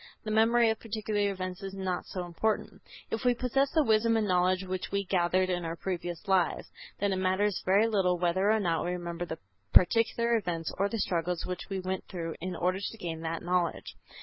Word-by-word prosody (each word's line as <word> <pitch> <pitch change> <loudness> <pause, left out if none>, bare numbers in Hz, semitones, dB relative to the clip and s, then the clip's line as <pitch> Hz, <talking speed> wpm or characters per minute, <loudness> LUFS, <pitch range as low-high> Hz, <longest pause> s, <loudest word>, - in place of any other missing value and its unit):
The 215 - -3
memory 225 +1 +4
of 220 - -4
particular 215 -2 -1
events 185 0 -5
is 195 0 -6
not 185 -2 -3
so 180 -2 -4
important. 195 +6 -2 0.3
If 225 - -2
we 245 -1 +3
possess 270 +3 +1
the 315 +1 +3
wisdom 225 -1 +3
and 215 -2 +1
knowledge 185 0 +2
which 185 0 -4
we 200 0 0
gathered 185 0 +2
in 175 -1 -1
our 165 0 -3
previous 175 +1 -4
lives, 190 -3 +2 0.3
then 200 -1 +1
it - - -1
matters 190 +1 +1
very 195 +4 +4
little 190 -5 +2
whether 180 +3 +1
or 220 0 +4
not 170 -5 0
we 175 - -1
remember 175 -1 -4
the 160 - -5 0.4
particular 235 +4 +4
events, 170 -6 -2
or 200 +1 +2
the 230 - -3
struggles 175 -3 -1
which 180 +1 -5
we 195 -1 -2
went 185 0 -3
through 165 -3 -4
in 180 +1 -3
order 180 +3 0
to 205 +3 -5
gain 165 -5 -5
that 165 0 -3
knowledge. 175 -1 -1
185 Hz, 205 wpm, -29 LUFS, 175-215 Hz, 0.4 s, memory